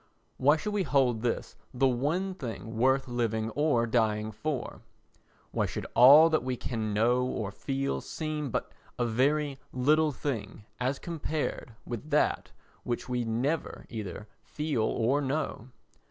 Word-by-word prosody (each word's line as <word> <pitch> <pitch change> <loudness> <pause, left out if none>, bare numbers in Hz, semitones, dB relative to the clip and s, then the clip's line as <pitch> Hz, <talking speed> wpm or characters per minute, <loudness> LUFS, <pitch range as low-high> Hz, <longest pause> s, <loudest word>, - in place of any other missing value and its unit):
Why 145 +4 +4
should 210 +7 -4
we 205 - +1
hold 130 -7 +2
this 120 -1 -2 0.2
the 135 +2 +4
one 155 +10 0
thing 115 -7 -6
worth 130 +4 +2
living 115 -2 -1
or 145 -3 +2
dying 110 -2 +1
for? 125 +4 -4 0.7
Why - - 0
should - - -5
all 140 +7 +9
that 155 - +2
we 130 -1 -2
can 110 -4 -3
know 120 +4 +3
or 110 -5 -2
feel 135 - -2
seem 155 - -4
but - - -3 0.3
a 120 - +1
very 135 +4 +1
little 150 +4 +3
thing 115 -6 -4
as 130 +2 0
compared 155 -7 -4
with 120 +6 -6
that 150 0 +1 0.3
which 120 -1 -3
we 125 -1 -1
never 130 +8 -2
either 105 -2 -6
feel 150 -6 -2
or 120 +5 +1
know? 135 -3 -2
125 Hz, 145 wpm, -29 LUFS, 115-150 Hz, 0.7 s, all